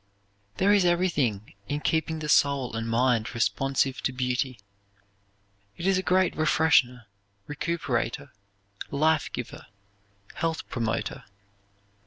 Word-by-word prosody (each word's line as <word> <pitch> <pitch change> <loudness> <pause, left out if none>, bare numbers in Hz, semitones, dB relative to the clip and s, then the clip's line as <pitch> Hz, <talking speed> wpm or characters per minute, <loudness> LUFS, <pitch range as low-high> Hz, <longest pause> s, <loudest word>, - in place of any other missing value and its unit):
There 200 +2 +4
is 200 -2 +4
everything 160 - 0 0.2
in 145 - -1
keeping 160 0 0
the 155 -1 -5
soul 140 -5 +2
and 115 0 -3
mind 120 -1 +1
responsive 135 +2 0
to - - 0
beauty. 125 -1 -2 1.2
It 170 - -5
is 190 -1 +3
a - - 0
great 185 -1 +2
refreshener, 150 -5 +3 0.4
recuperator, 145 -4 -2 0.6
life 155 +1 +1
giver, - - -7 0.7
health 165 -1 -2
promoter. 115 -3 -3
140 Hz, 110 wpm, -26 LUFS, 125-160 Hz, 1.2 s, There